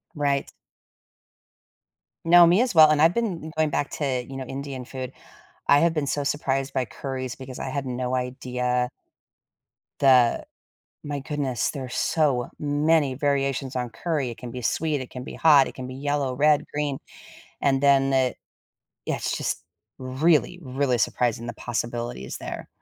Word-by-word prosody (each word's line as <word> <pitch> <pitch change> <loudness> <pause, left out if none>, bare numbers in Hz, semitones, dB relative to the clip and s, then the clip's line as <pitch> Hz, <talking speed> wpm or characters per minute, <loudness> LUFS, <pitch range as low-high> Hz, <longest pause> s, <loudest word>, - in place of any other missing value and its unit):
Right. 140 -2 0 1.7
No, 175 +1 +8
me 180 +7 +4
as 250 -6 0
well 155 -1 +9
and 150 -1 +3
I've 165 +2 +5
been 180 -9 -2
going 155 -1 +2
back 145 0 -1
to, 130 -4 -1
you 135 - -8
know, 130 - -4
Indian 135 -1 -6
food. 130 -1 -6 0.6
I 145 - +6
have 170 +1 +3
been 150 -3 -1
so 145 +1 -1
surprised 135 -1 -1
by 130 -2 0
curries 130 0 -5
because 130 -1 -9
I - - -4
had 140 0 -3
no 125 0 -2
idea 125 -1 -1 1.1
the 130 -4 +4 0.6
my 145 -1 -3
goodness, 135 -4 -2
there 140 -3 -6
are - - -9
so 135 -3 +1
many 145 -1 +2
variations 135 -1 -1
on 125 -1 -2
curry: 145 +2 -2
it 115 - -8
can 125 -2 -8
be 125 +1 -6
sweet, 150 +4 0
it 130 - -8
can 125 0 -7
be - - -8
hot, 145 -4 +5
it - - -10
can 130 -1 -6
be 130 - -7
yellow, 140 -1 -1
red, 150 +1 +3
green, 145 -2 -2 0.6
and 135 -1 +2
then 135 -1 +4
it 130 -1 +1 0.7
yeah, - - 0
it's - - -2
just - - -3 0.3
really, 150 +6 +1
really 130 -2 0
surprising 120 +1 0
the - - -4
possibilities 120 - -4
there. - - -7
135 Hz, 165 wpm, -25 LUFS, 125-150 Hz, 1.7 s, well